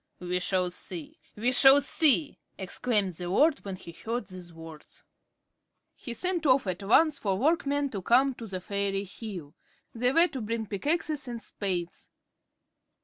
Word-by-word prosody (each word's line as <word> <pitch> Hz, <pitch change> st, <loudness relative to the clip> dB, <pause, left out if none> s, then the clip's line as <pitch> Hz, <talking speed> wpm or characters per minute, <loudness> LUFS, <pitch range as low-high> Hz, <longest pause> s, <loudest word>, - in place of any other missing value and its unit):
"We 180 Hz, 0 st, -2 dB
shall 180 Hz, -1 st, 0 dB
see! 175 Hz, -3 st, -7 dB, 0.2 s
We 235 Hz, +4 st, 0 dB
shall 270 Hz, +2 st, +7 dB
see!" 295 Hz, +1 st, +3 dB, 0.2 s
exclaimed 200 Hz, 0 st, -1 dB
the 175 Hz, +1 st, -6 dB
lord 295 Hz, -, +3 dB
when 195 Hz, -2 st, -5 dB
he 185 Hz, -2 st, -11 dB
heard 225 Hz, +6 st, -5 dB
these 180 Hz, -1 st, -10 dB
words. 160 Hz, -2 st, -13 dB, 0.9 s
He 240 Hz, -3 st, -7 dB
sent 355 Hz, -2 st, -1 dB
off 260 Hz, -1 st, +4 dB
at 185 Hz, 0 st, -3 dB
once 280 Hz, +9 st, +3 dB
for 195 Hz, -3 st, -1 dB
workmen 285 Hz, -, 0 dB
to 195 Hz, -, -5 dB
come 260 Hz, +7 st, +3 dB
to 230 Hz, -2 st, -9 dB
the 185 Hz, -2 st, -5 dB
fairy 200 Hz, 0 st, -2 dB
hill. 190 Hz, -7 st, -8 dB, 0.4 s
They 245 Hz, +2 st, +1 dB
were 335 Hz, +5 st, +5 dB
to 270 Hz, -5 st, -6 dB
bring 225 Hz, +1 st, -3 dB
pickaxes 295 Hz, -, -1 dB
and 240 Hz, -1 st, -5 dB
spades. 180 Hz, -6 st, -5 dB
215 Hz, 155 wpm, -28 LUFS, 185-275 Hz, 0.9 s, shall